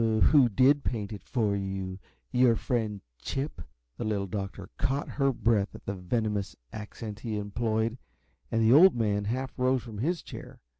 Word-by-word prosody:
"Who 115 +4 +5
did 135 +6 +4
paint 110 -3 -3
it 105 - -7
for 110 -6 0
you? 95 -1 -4 0.3
Your 125 -2 +5
friend, 110 -4 -1 0.2
Chip?" 140 +3 -3 0.4
The - - -3
Little 105 -3 0
Doctor 95 0 -5
caught 135 +2 0
her 135 -1 +1
breath 110 -4 +1
at - - -12
the 100 - -2
venomous 100 +2 -2 0.2
accent 105 0 -7
he 110 -2 -3
employed, 110 +3 -1 0.5
and 115 -1 +2
the 110 +2 +6
Old 180 +4 +8
Man 105 -3 0
half 130 +5 -2
rose 130 -1 +2
from 110 -4 -8
his 165 +8 -1
chair. - - -10
110 Hz, 165 wpm, -29 LUFS, 100-125 Hz, 0.5 s, Old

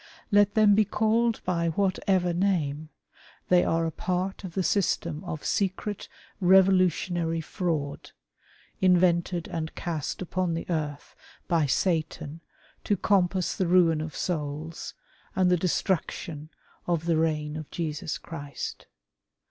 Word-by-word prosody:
Let 205 0 +4
them 215 -2 +6
be 215 +2 +5
called 220 +2 +1
by 170 -2 +1
whatever 185 0 +1
name, 160 -5 0 0.6
they 180 -1 +5
are 165 0 +1
a 165 - -1
part 185 +4 -2
of 180 -3 -7
the 190 - +1
system 170 -4 0
of 160 -4 -5
secret 200 +1 -2 0.3
revolutionary 180 -3 +3
fraud, 160 -4 -3 0.7
invented 175 -1 +3
and 160 -1 -4
cast 160 -4 -3
upon 185 -1 -1
the 165 - -4
earth 150 -3 -3 0.3
by 165 -4 +2
Satan 160 -1 -1 0.4
to 205 - +1
compass 185 -2 +1
the 185 - 0
ruin 170 -3 +4
of 155 0 -6
souls, 155 -1 -4 0.4
and 185 -1 +3
the - - +6
destruction 165 -3 -2 0.4
of 170 -2 0
the 165 -2 +2
reign 155 -2 0
of 155 -2 -6
Jesus 160 0 -3
Christ. 145 -4 -7
175 Hz, 125 wpm, -27 LUFS, 160-185 Hz, 0.7 s, them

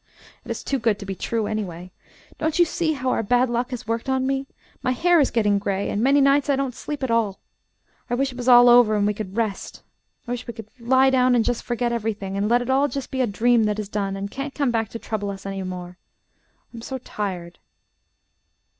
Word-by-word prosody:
It - - -14
is - - -4
too 275 - -1
good 220 -3 +1
to 200 - -8
be 195 - -4
true, 225 +3 -2
anyway. 185 -5 -4 0.5
Don't 315 +1 -1
you 350 - +6
see 325 -1 -1
how 260 -3 -1
our - - +1
bad 245 +3 +2
luck 240 +1 -1
has 250 -2 -6
worked 230 +3 -2
on 260 0 +1
me? 270 0 -1 0.3
My 255 - 0
hair 345 +6 +3
is 280 - +3
getting 210 -3 +2
gray, 200 0 -2
and 210 - -1
many 275 +4 +4
nights 275 0 +3
I 280 - +4
don't 270 -2 -2
sleep 290 +3 -6
at 260 - -1
all. 220 -4 +1 0.7
I 245 - +1
wish 270 +1 0
it - - -12
was 250 0 -5
all 245 -1 +8
over 240 -3 +6
and 205 -1 +2
we 210 - +1
could 205 -1 -7
rest. 220 -4 -3 0.4
I - - -4
wish 245 0 -4
we 235 - -6
could 225 -2 -10
lie 260 +3 +4
down 255 -1 +4
and 230 -2 +2
just 245 -1 -1
forget 240 0 -2
everything, 210 -4 -3
and 200 +2 0
let 240 +1 +3
it 245 - -8
all 275 +2 +3
be 245 - -9
just 275 -1 -5
a 260 -2 +1
dream 230 +2 +3
that 210 0 0
is 210 -2 -4
done 200 -2 -2
and 200 +1 -5
can't 275 +1 -5
come 280 -4 +1
back 225 -2 -1
to - - -6
trouble 215 -3 -4
us 195 -1 -7
any 195 0 -4
more. 180 -1 -7 0.7
I - - -9
am - - -8
so 265 +3 -5
tired." 185 -8 -5
235 Hz, 245 wpm, -23 LUFS, 205-260 Hz, 0.7 s, all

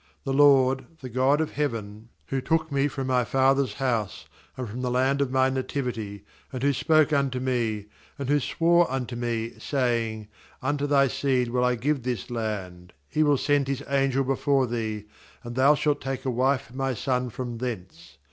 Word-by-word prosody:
^The 135 - -1
LORD, 135 -2 +5
the 130 - -6
God 130 +5 +2
of 160 - -2
heaven, 115 -6 -4 0.2
who 135 -1 -1
took 160 +2 0
me 140 0 +2
from 135 -1 -4
my 130 -1 +2
father's 135 +2 +2
house, 120 -7 -2 0.3
and 130 -2 -4
from 115 +4 -6
the 125 - -1
land 130 +3 +1
of 140 - +1
my 130 0 +3
nativity, 120 -6 -4 0.3
and 130 -1 -5
who 140 0 +3
spoke 155 +2 +3
unto 135 -3 +1
me, 120 -5 -1 0.3
and 140 -2 -4
who 145 +1 +3
swore 170 +3 +2
unto 130 -2 -3
me, 115 -1 -2
saying: 115 -5 -1 0.3
Unto 145 +2 -1
thy 140 -1 +4
seed 130 -2 0
will 125 +1 +1
I 125 0 +2
give 140 +4 0
this 120 -2 -4
land; 95 -6 -4 0.2
He 155 - 0
will 145 -2 +4
send 145 0 +1
His 140 0 -2
angel 135 -1 +1
before 135 0 +1
thee, 110 -3 -3 0.4
and 120 0 -7
thou 135 +3 +5
shalt 150 0 0
take 135 0 -4
a 130 - +1
wife 130 +2 +2
for 120 - -18
my 135 -1 -1
son 125 0 -1
from 120 0 -5
thence. 110 -8 -6
130 Hz, 185 wpm, -26 LUFS, 120-140 Hz, 0.4 s, LORD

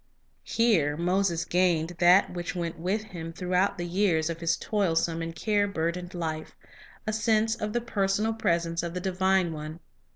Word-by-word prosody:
Here 175 -11 +2
Moses 175 -1 +1
gained 175 -2 +2
that 180 +2 +5
which 175 0 -4
went 170 -2 -3
with 195 +6 -1
him 165 -6 -7
throughout 180 +3 0
the 175 - -3
years 170 -3 +1
of 165 - -6
his 165 0 +1
toilsome 165 -5 0
and 165 0 -5
care 205 0 +1
burdened 175 0 -3
life, 160 -2 -4 0.3
— - - -22
a 215 - -1
sense 220 0 +2
of 215 -2 -3
the 240 - 0
personal 210 -1 0
presence 170 -5 0
of 170 0 -5
the - - -1
Divine 190 -1 +1
One. 155 +1 -7
180 Hz, 170 wpm, -27 LUFS, 165-200 Hz, 0.3 s, that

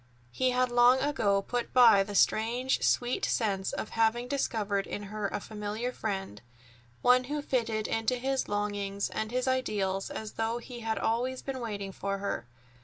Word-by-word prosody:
He 255 - +1
had 250 0 +1
long 245 +1 +6
ago 220 -8 +1
put 245 +3 -3
by 235 -5 +8
the 200 +1 -4
strange, 240 +6 +2
sweet 245 0 +1
sense 195 -4 0
of - - -4
having 225 +2 +1
discovered 215 -7 -1
in 205 - -5
her 210 -1 -1
a - - -3
familiar 215 +3 -4
friend—one 120 - -2
who 295 +3 -3
fitted 225 -5 -1
into 225 +2 0
his 265 +2 -1
longings 205 -1 -2
and 220 - -2
his 250 +2 -1
ideals 205 -7 0
as 215 -1 -6
though 225 +1 -1
he 240 0 -8
had 225 -1 -2
always 250 +3 -1
been 270 -1 -4
waiting 205 -4 -4
for 200 +1 -3
her. 195 -11 -3
220 Hz, 165 wpm, -30 LUFS, 200-250 Hz, -, by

